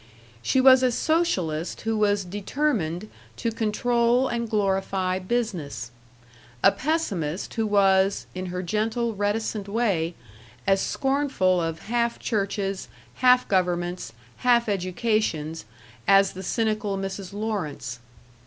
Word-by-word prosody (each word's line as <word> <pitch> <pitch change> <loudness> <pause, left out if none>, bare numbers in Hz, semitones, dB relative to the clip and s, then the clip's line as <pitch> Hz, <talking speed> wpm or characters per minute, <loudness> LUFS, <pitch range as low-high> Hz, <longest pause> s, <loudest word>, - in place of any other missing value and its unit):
She 260 - +2
was 260 0 +7
a 255 -1 +3
socialist 195 - 0
who 225 0 -1
was 205 -2 +2
determined 205 - -1 0.3
to 230 - -1
control 235 +3 +2
and 235 -2 -2
glorify 195 -3 0
business; 185 - -3 0.7
a 195 - +8
pessimist 200 - -2
who 225 -2 0
was, 195 -1 +3
in 185 0 -4
her 180 +1 -4
gentle 225 +5 -1
reticent 205 0 -1
way, 200 -7 0 0.5
as 195 0 +3
scornful 265 -10 +1
of 165 -1 -3
half 235 +1 0
churches, 200 -3 -2 0.3
half 250 0 +5
governments, 175 - 0 0.3
half 240 -2 +3
educations, 185 - -1 0.4
as 195 0 +5
the 185 - -7
cynical 215 0 -1
Mrs. 195 -1 -5
Lawrence. 200 - -4
205 Hz, 115 wpm, -25 LUFS, 185-235 Hz, 0.7 s, a